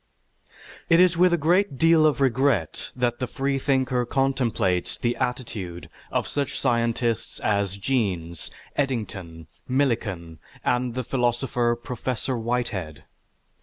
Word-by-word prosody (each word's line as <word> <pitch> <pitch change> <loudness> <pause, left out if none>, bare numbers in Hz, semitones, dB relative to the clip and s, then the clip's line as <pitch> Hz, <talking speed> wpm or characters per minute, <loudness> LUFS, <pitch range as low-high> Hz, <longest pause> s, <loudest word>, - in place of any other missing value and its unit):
It 165 - +6
is 180 -1 +5
with 180 +1 +5
a 175 - +3
great 170 0 +2
deal 165 0 +5
of 150 - +1
regret 130 - +1
that 120 -1 0
the 125 - -1
freethinker 135 -2 0
contemplates 120 -8 0
the 120 0 0
attitude 100 - -4 0.2
of - - 0
such 140 -1 -2
scientists 115 -1 0
as 100 -2 0
Jeans, 95 - -1 0.3
Eddington, 100 - -3 0.2
Millikan, 105 - -1 0.3
and 125 -1 +1
the 130 - -1
philosopher 120 -1 +1
Professor 125 +1 -3
Whitehead. 115 -9 -2
125 Hz, 115 wpm, -25 LUFS, 105-135 Hz, 0.3 s, It